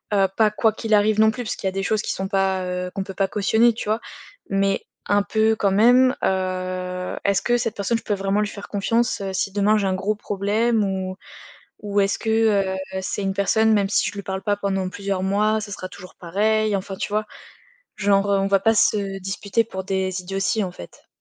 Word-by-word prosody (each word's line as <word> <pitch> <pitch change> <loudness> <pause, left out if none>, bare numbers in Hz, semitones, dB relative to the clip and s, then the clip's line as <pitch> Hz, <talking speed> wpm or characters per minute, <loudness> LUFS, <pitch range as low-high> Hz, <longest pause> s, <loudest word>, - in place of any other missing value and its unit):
heu 195 -1 +4
pas 220 -1 +4
quoi 215 +1 +1
qu'il 220 -1 +1
arrive 210 +1 +3
non 220 - +6
plus, 245 +2 -4
parce - - -3
qu'il 195 - -4
y - - +3
a - - -6
des 195 0 -3
choses 215 +1 +1
qui - - -3
sont 190 0 -3
pas, 190 -2 0
heu, 180 0 -3
qu'on 195 - -2
peut 195 - -8
pas 195 +1 0
cautionner, 220 +4 +3
tu 220 - -6
vois? 220 +2 0 0.5
Mais, 195 0 +1 0.2
un 205 0 +3
peu 220 +2 +2
quand 200 -2 +1
même, 245 +5 +5
heu, 185 -1 -2
est-ce 200 -1 +2
que 240 0 +2
cette 230 -3 -2
personne, 215 +3 0
je - - -19
peux 205 - -1
vraiment 195 +1 0
lui 210 - 0
faire 200 0 -9
confiance, 225 +2 0
heu, 195 -1 -4
si 195 +1 -1
demain 210 +2 +3
j'ai 200 - 0
un 190 - +1
gros 195 +3 -1
problème? 210 +3 0
Ou 190 -1 -2 0.7
ou 205 -1 0
est-ce 195 0 +1
que, 220 - -2
heu, 205 -4 +2 0.3
c'est 200 - -3
une 195 0 -1
personne, 220 +3 +3
même 200 -1 +1
si - - +2
je - - -7
lui 200 - -5
parle 190 0 -4
pas 205 -2 0
pendant 195 -2 -1
plusieurs 195 -1 -3
mois, 210 +3 +1
ça 205 -1 -7
sera 185 -2 -6
toujours 185 0 -12
pareil? 215 +4 +1
Enfin 195 0 -3
tu - - -3
vois? 215 0 0 0.7
Genre, 200 0 +2
heu, 195 - +3
on 195 - +1
va 195 -1 +3
pas 225 +2 +4
se 200 -2 +1
disputer 195 +3 -1
pour 190 -4 -6
des 190 -1 -2
idioties, 195 +3 -1
en 180 - -4
fait. 85 - -13
200 Hz, 230 wpm, -22 LUFS, 190-215 Hz, 0.7 s, non